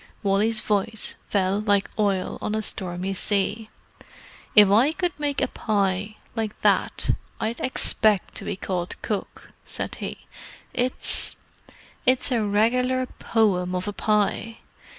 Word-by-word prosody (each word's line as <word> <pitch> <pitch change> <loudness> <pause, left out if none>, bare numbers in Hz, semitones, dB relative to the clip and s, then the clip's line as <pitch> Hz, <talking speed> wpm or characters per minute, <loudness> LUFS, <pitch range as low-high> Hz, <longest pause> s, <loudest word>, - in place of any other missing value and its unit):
Wally's 210 +3 +2
voice 210 +1 -1
fell 195 0 +1
like 205 -1 +2
oil 200 -3 0
on 215 - -2
a 220 - -1
stormy 185 0 -3
sea. 205 +3 -1 0.9
"If 210 -2 +9
I 245 +9 +5
could 355 0 -1
make 285 -1 -1
a - - +1
pie 200 -1 -1 0.2
like 220 -2 -3
that - - +2 0.3
I'd 225 +2 -2
expect 215 -5 +1
to - - -5
be - - -2
called 180 -2 -3
'Cook,'" 210 -3 -4
said - - -5
he. - - -6 0.5
"It's—it's 255 +1 +1
a 235 -3 +2
regular 250 +5 +2
poem 185 -5 +1
of 180 +2 -3
a 205 - -2
pie!" 215 +2 0
210 Hz, 130 wpm, -24 LUFS, 195-225 Hz, 0.9 s, If